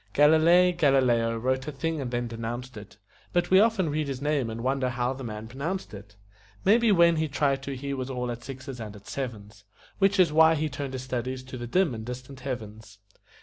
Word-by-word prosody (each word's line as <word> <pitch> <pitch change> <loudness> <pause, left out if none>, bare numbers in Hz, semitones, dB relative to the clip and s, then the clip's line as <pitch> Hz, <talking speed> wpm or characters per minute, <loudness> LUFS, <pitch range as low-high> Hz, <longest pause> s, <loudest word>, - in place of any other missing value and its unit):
Galilei 160 +5 +6
Galileo 125 -7 +3
wrote 130 +4 -1
a - - -2
thing 155 +2 -3
and 130 - -3
then 120 0 -2
denounced 115 +2 -6
it 105 0 -11 0.4
But 175 0 +1
we 190 - +7
often 205 -7 +2
read 150 0 -1
his 135 -2 -4
name 145 -4 0
and 115 +1 -5
wonder 130 0 0
how 125 +1 -1
the 135 0 -8
man 110 -1 -6
pronounced 145 - -4
it. 100 0 -11 0.5
Maybe 225 +2 +5
when 170 -3 +5
he 160 0 0
tried 140 -1 0
to 135 0 -5
he 140 +2 -4
was 130 -1 -4
all 125 -2 -3
at 120 0 -7
sixes 130 -1 -8
and 110 -2 -7
at 100 0 -14
sevens, 105 -6 -6 0.4
Which 195 0 +3
is 175 -5 +4
why 160 +1 +6
he 155 0 -1
turned 135 0 -5
his 130 -1 -4
studies 130 0 -4
to 130 0 -9
the 120 -1 -6
dim 180 +2 +2
and 110 -1 -6
distant 125 +3 -8
heavens. 110 -5 -7
130 Hz, 215 wpm, -27 LUFS, 120-155 Hz, 0.5 s, we